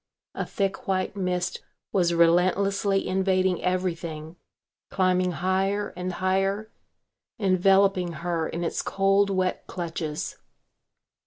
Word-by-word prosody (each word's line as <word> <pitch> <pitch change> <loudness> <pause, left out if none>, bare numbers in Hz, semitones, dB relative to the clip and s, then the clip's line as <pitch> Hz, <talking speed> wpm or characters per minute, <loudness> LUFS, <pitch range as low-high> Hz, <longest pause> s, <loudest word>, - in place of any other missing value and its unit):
A - - -4
thick 195 -1 -2
white 190 0 -1
mist 180 -2 -2 0.3
was 175 -3 +3
relentlessly 190 +4 +3
invading 185 -1 +1
everything, 170 -3 -2 0.5
climbing 185 -1 +2
higher 190 +3 0
and 180 0 -4
higher, 195 +4 0 0.7
enveloping 190 -2 +3
her 170 0 -2
in 170 - -4
its 165 - -1
cold, 195 +1 +2
wet 185 -1 -1
clutches. 165 -3 -4
185 Hz, 100 wpm, -26 LUFS, 175-195 Hz, 0.7 s, was